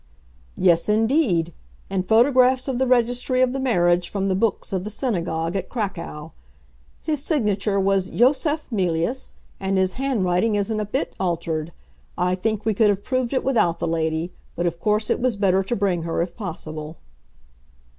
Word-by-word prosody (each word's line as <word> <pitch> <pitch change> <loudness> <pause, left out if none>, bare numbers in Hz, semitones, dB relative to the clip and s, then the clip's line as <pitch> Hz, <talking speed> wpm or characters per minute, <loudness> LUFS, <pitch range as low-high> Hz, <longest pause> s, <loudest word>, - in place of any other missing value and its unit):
"Yes, 175 0 +3
indeed; 215 - +2 0.3
and 190 -1 -2
photographs 255 +3 +4
of 260 -2 -1
the 265 - +2
registry 250 +1 +2
of 255 0 +1
the 270 - -2
marriage 175 -9 +2
from 195 -1 -1
the 190 - +1
books 210 0 -1
of 185 -1 -1
the 210 - -5
synagogue 170 -8 -2
at 190 -1 -3
Cracow. 170 -8 -5 0.7
His 300 -3 -2
signature 210 - 0
was 195 -1 +1
Yosef 295 +4 +1
Mealyus, 185 +4 -1 0.2
and 195 0 0
his 185 -1 +1
handwriting 220 -6 +1
isn't 205 +2 -1
a 210 - -1
bit 260 +8 -2
altered. 165 -3 -2 0.5
I 180 0 +1
think 210 +3 -2
we 220 - +2
could 210 +1 +3
have 200 0 0
proved 255 -2 -1
it 265 - 0
without 225 -11 +2
the - - -2
lady; 160 +1 -1 0.2
but 175 - -1
of 170 -1 -2
course 210 +2 +1
it - - +1
was 250 -2 +1
better 195 -2 +2
to 195 +5 -2
bring 195 -5 0
her 165 0 -1
if 175 0 -7
possible." 160 -5 -6
195 Hz, 170 wpm, -23 LUFS, 175-245 Hz, 0.7 s, photographs